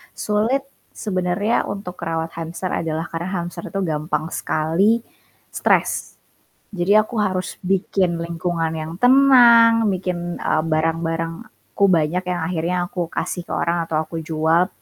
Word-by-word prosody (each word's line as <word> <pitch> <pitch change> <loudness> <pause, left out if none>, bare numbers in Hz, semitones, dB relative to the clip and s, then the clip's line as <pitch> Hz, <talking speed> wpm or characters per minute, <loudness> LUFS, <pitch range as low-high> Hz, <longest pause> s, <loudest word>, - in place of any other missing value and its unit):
sulit 220 +6 0 0.3
sebenernya 195 +2 -1
untuk 195 -3 -6
merawat 165 -1 -4
hamster 165 +3 -4
adalah 160 0 -2
karena 170 +3 -5
hamster 175 -2 -4
itu 195 - -2
gampang 155 -1 -2
sekali 170 +8 +1 0.5
stres. - - 0 0.5
Jadi 195 +1 +1
aku 215 +1 +2
harus 185 -3 -2
bikin 185 -1 0
lingkungan 170 -1 -2
yang 160 0 -5
tenang, 240 -3 +6
bikin, 175 -2 -4
eee, 155 0 0
barang-barangku 165 +6 -2
banyak 175 0 +2
yang 180 -1 -2
akhirnya 170 +1 -1
aku 175 -1 -3
kasih 175 - -3
ke - - -5
orang 170 0 0
atau 155 -1 -1
aku 165 +1 -6
jual, 160 +3 +2
175 Hz, 130 wpm, -21 LUFS, 165-200 Hz, 0.5 s, tenang